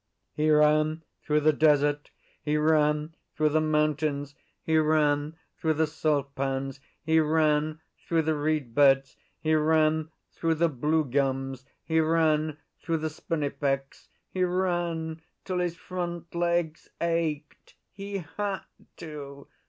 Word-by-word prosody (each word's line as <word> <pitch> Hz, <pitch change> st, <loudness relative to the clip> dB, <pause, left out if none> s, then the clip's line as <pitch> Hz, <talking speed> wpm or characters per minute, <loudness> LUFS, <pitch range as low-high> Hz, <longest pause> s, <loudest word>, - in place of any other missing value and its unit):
He 155 Hz, +1 st, +1 dB
ran 155 Hz, +1 st, +3 dB, 0.2 s
through 150 Hz, 0 st, +1 dB
the 155 Hz, +1 st, +4 dB
desert; 145 Hz, -1 st, +2 dB, 0.3 s
he 150 Hz, +1 st, 0 dB
ran 150 Hz, 0 st, +2 dB, 0.2 s
through 155 Hz, 0 st, +2 dB
the 155 Hz, +1 st, +2 dB
mountains; 150 Hz, -2 st, 0 dB, 0.3 s
he 160 Hz, 0 st, +3 dB
ran 150 Hz, -1 st, +2 dB, 0.2 s
through 160 Hz, -1 st, +1 dB
the 160 Hz, +1 st, +2 dB
salt 150 Hz, -2 st, -1 dB
pans; 135 Hz, 0 st, -3 dB, 0.2 s
he 160 Hz, +1 st, +3 dB
ran 155 Hz, 0 st, +1 dB, 0.3 s
through 165 Hz, -1 st, +2 dB
the 160 Hz, +1 st, +1 dB
reed 150 Hz, -5 st, -1 dB
beds; 135 Hz, 0 st, +4 dB, 0.2 s
he 155 Hz, 0 st, 0 dB
ran 155 Hz, 0 st, +2 dB, 0.2 s
through 165 Hz, -1 st, 0 dB
the 170 Hz, +1 st, +2 dB
blue 150 Hz, +3 st, 0 dB
gums; 135 Hz, -1 st, -1 dB, 0.2 s
he 160 Hz, 0 st, +1 dB
ran 155 Hz, -1 st, +2 dB, 0.2 s
through 165 Hz, -1 st, -1 dB
the 155 Hz, 0 st, -3 dB
spinifex; 140 Hz, -3 st, -3 dB, 0.2 s
he 185 Hz, -, -1 dB
ran 175 Hz, -3 st, -1 dB, 0.2 s
till 185 Hz, -2 st, -2 dB
his 175 Hz, -1 st, -1 dB
front 175 Hz, -1 st, -5 dB
legs 170 Hz, -2 st, -1 dB
ached. 165 Hz, -3 st, -2 dB, 0.2 s
He 200 Hz, -2 st, -6 dB
had 205 Hz, -2 st, -1 dB, 0.4 s
to! 140 Hz, -3 st, -9 dB
155 Hz, 130 wpm, -27 LUFS, 145-160 Hz, 0.4 s, the